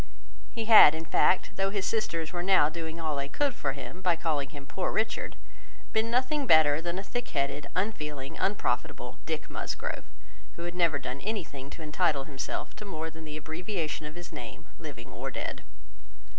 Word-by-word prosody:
He 230 -2 -3
had, 215 -9 +10
in 160 +1 -5
fact, 180 - +3
though 195 0 +2
his 200 -1 -1
sisters 185 -7 -1
were 175 - -1
now 180 -5 +5
doing 160 0 -5
all 155 -2 -1
they 140 0 -1
could 285 - +1
for 135 - -1
him, 135 +6 -8
by 180 -2 +3
calling 150 -4 0
him 145 -1 -9
"poor 180 +6 -2
Richard," 220 +1 -1 0.6
been 220 +1 +2
nothing 260 +4 +1
better 155 -1 +6
than 170 +1 -2
a 195 - -3
thick 245 +4 -3
headed, 140 +1 -1
unfeeling, 150 -9 -2
unprofitable 125 -11 -1
Dick - - -2
Musgrove, - - -3 0.5
who 170 - -6
had 175 0 -3
never 170 -4 +3
done 130 0 -5
anything 155 -11 -4
to 160 - -8
entitle 150 -2 +2
himself 135 -2 -4
to - - -7
more 160 -5 -4
than 160 0 -10
the 150 0 -5
abbreviation 160 0 -3
of 150 - -9
his 175 0 -8
name, 115 -3 -8
living 140 -8 -8
or - - -4
dead. - - -4
160 Hz, 185 wpm, -30 LUFS, 145-195 Hz, 0.6 s, had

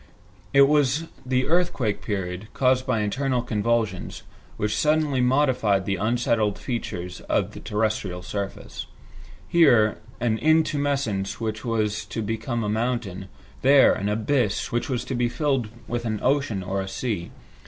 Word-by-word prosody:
It 140 0 +7
was 145 +1 +3 0.2
the 130 0 +1
earthquake 160 - +1
period, 95 -1 -4
caused 130 0 +2
by 115 -4 +1
internal 125 +4 0
convulsions, 110 -4 -1 0.3
which 105 0 -1
suddenly 150 -3 +2
modified 125 -7 +2
the 100 -1 -1
unsettled 110 0 +1
features 90 -8 -5
of - - +1
the - - -9
terrestrial 105 -4 -2
surface. 100 +1 -5 0.6
Here, 115 - +4 0.2
an 115 -2 0
intumescence 140 -10 +1
which 110 -1 -3
was 110 -3 -1
to 110 - -4
become 115 +2 -2
a - - -1
mountain, 105 -4 -2 0.3
there, 135 +1 +6
an 100 - -2
abyss 110 +1 0
which 120 +3 -1
was 125 -3 -2
to - - -4
be 120 -1 +1
filled 135 -2 0 0.2
with 120 0 -2
an 110 -2 -1
ocean 130 -8 +1
or 95 +1 -2
a 95 - -5
sea. 95 -3 -3
115 Hz, 145 wpm, -24 LUFS, 105-130 Hz, 0.6 s, It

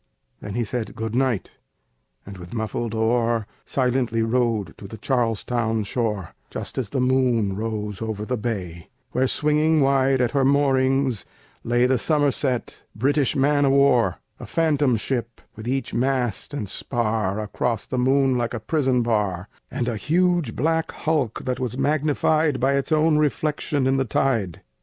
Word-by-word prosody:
Then 105 0 -7
he 120 - 0
said 115 +1 -4
"good 110 0 -4
night," 125 -5 -1 0.7
and 95 -1 -9
with 90 +6 -9
muffled 115 0 -3
oar 115 0 +1 0.2
Silently 125 -3 +1
rowed 115 -6 0
to 100 - -8
the 110 - -9
Charlestown 115 -1 0
shore, 105 -4 -2 0.2
Just - - -5
as 120 -6 -3
the 135 - -2
moon 125 -6 +2
rose 105 -2 -4
over 110 -2 -3
the 125 - -1
bay, 95 -8 -5 0.2
Where, 130 +1 +1
swinging 150 +3 +2
wide 135 -1 +3
at 125 -2 +1
her 140 -1 +2
moorings, 135 -3 +2 0.4
lay 120 +1 +2
The 130 -1 +2
Somerset, 145 -4 0
British 140 +6 +1
man 145 +1 +3
of 135 -1 +3
war: 125 -9 +4 0.2
A - - -8
phantom 150 -6 +2
ship, 120 +1 -3 0.2
with 110 +1 -8
each 135 +2 -2
mast 125 -4 -1
and 130 -8 -4
spar 110 -2 -1
Across 110 +1 -2
the 130 - -3
moon, 135 +1 +3
like 120 0 -2
a - - -3
prison 130 -1 +1
bar, 105 -5 -1 0.2
And 125 -2 -3
a 115 -3 -1
huge 175 - +1
black 160 +4 0
hulk, 150 -8 -1
that 125 0 -2
was 125 -1 -3
magnified 150 0 +1
By 135 +3 +2
its 140 +2 -1
own 155 0 +3
reflection 150 -1 0
in 135 +1 +2
the 135 - +1
tide. 115 - 0
125 Hz, 160 wpm, -23 LUFS, 110-140 Hz, 0.7 s, war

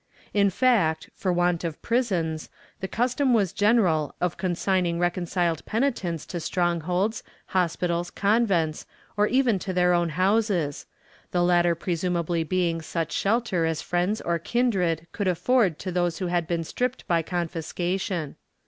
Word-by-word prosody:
^ - - -27
In 200 -1 +4
fact, 190 -8 +2
for 185 - -1
want 175 -1 +1
of 165 -3 -4
prisons, 180 -10 -1 0.3
the 190 - -3
custom 250 +4 +1
was 200 -6 +1
general 205 -9 +2
of 180 -1 0
consigning 180 -1 0
reconciled 175 -1 0
penitents 220 - -1
to 175 - -5
strongholds, 175 +4 0 0.3
hospitals, 175 -1 0
convents, 200 -7 +1 0.3
or 210 +1 +3
even 250 -5 +2
to 185 +1 -4
their 180 0 +3
own 175 -1 +2
houses 185 -3 0 0.2
— - - -30
the 175 -1 +2
latter 175 -1 +3
presumably 170 -1 -1
being 170 -1 0
such 165 0 -3
shelter 205 -4 +1
as 160 -1 -2
friends 180 +5 0
or 170 0 -1
kindred 180 -6 0
could 205 - -2
afford 185 - +2
to 185 - -5
those 175 -1 0
who 185 - -3
had 175 -2 0
been 170 -1 -1
stripped 250 +9 -3
by 170 -1 +2
confiscation. 175 0 -3
180 Hz, 150 wpm, -25 LUFS, 170-200 Hz, 0.3 s, In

